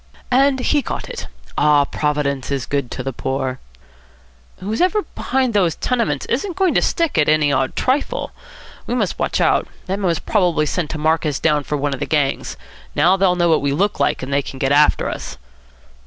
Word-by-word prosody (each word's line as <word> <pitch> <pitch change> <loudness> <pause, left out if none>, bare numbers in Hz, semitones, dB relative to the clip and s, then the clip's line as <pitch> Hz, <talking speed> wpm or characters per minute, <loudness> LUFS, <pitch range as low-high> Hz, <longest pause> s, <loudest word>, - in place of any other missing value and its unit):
"And 265 +1 +3
he 290 +3 +2
got - - -5
it. - - -6 0.3
Ah, 150 -1 +4
Providence 145 -2 -1
is 135 -3 -2
good 140 -3 -2
to 125 - -5
the 135 0 -4
poor." 130 0 -3 1.0
"Whoever's 355 - 0
behind 260 -3 0
those 180 -6 +2
tenements 230 - -1
isn't 340 +9 -2
going 375 -2 +2
to - - +3
stick 335 - +1
at 150 - +3
any 155 -2 +3
odd 135 -1 0
trifle. 290 - -1 0.6
We 245 - -1
must 215 -7 -1
watch - - 0
out. - - +2 0.2
That 195 +2 -2
man 195 - 0
was 170 -2 +1
probably 175 -7 +1
sent 155 +1 -2
to 160 - -4
mark 160 +2 +1
us 150 -4 -1
down 150 -3 +1
for 150 - -2
one 145 0 -1
of 135 - -5
the - - -3
gangs. 145 -3 -1 0.4
Now 180 +2 +4
they'll 190 -2 +2
know 175 -1 +2
what 160 - +3
we 140 0 0
look 200 +7 0
like, - - +1
and 135 +2 -4
they 140 - +3
can 135 - -8
get 135 +1 0
after 150 +1 +4
us." - - -6
160 Hz, 200 wpm, -19 LUFS, 140-225 Hz, 1.0 s, Ah